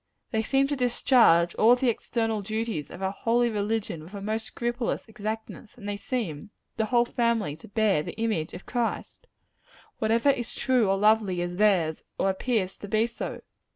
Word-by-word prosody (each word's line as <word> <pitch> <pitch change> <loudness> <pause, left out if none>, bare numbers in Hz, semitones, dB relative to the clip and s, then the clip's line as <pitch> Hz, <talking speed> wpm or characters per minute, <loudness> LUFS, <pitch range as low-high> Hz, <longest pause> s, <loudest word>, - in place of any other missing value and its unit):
They 220 - +1
seem 270 +4 +2
to 285 +1 -1
discharge 235 -9 +4
all 230 +3 +6
the 250 +1 0
external 225 -1 -2
duties 215 -6 -3
of 185 - -8
our 190 - 0
holy 235 +3 +1
religion 210 -5 -2
with 180 +6 -11
a - - -5
most 220 +2 -3
scrupulous 240 0 -2
exactness; 220 +2 -6
and 205 -4 -9
they 205 - -2
seem 200 - -4 0.3
the 220 - 0
whole 240 +1 +3
family 235 -10 0
to - - -14
bear 210 -5 +2
the 155 - -7
image 220 -9 -1
of 185 - -10
Christ. 245 - -3 0.7
Whatever 230 +5 +3
is 240 -4 -4
true 250 -6 +2
or 195 - +2
lovely, 210 -3 +3
is 175 0 -3
theirs; 185 -7 +2 0.2
or 195 - +2
appears 190 -1 -1
to 205 - -8
be 215 +3 +2
so. 235 0 -6
220 Hz, 180 wpm, -27 LUFS, 195-235 Hz, 0.7 s, all